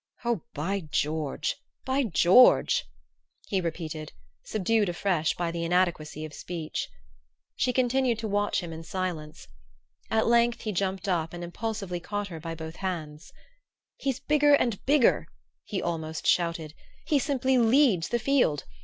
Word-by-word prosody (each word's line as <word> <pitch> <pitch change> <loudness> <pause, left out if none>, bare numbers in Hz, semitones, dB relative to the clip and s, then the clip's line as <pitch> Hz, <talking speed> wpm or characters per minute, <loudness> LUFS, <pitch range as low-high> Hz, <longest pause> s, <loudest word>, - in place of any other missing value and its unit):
"Oh, 235 -7 0
by 180 +7 -1
George 155 -2 -2 0.3
by 265 +1 +1
George," 180 - +5 0.6
he 190 - 0
repeated, 160 -2 -5 0.3
subdued 215 0 +1
afresh 175 -2 0
by 170 -1 -2
the 170 0 -3
inadequacy 170 -3 0
of 155 - -10
speech. 165 - -5 0.7
She 250 - +1
continued 250 -1 +2
to 225 0 -3
watch 205 0 0
him 170 -2 -6
in 160 - -7
silence. 165 -3 -5 0.6
At 220 0 +2
length 235 0 +3
he 215 - -2
jumped 195 +1 -2
up 165 -3 0
and 175 0 -6
impulsively 195 0 -4
caught 205 +3 -4
her 165 -3 -7
by 165 +1 -5
both 160 +1 -8
hands. 160 -5 -5 0.6
"He's 270 -1 -2
bigger 290 0 +4
and 235 -7 -1
bigger!" 285 -3 +4 0.4
he 200 - -3
almost 160 -2 -3
shouted. 170 -3 +1 0.3
"He 295 - +2
simply 265 -2 +1
leads 230 - +4
the 240 - +1
field! 235 - +2
185 Hz, 145 wpm, -27 LUFS, 165-235 Hz, 0.7 s, George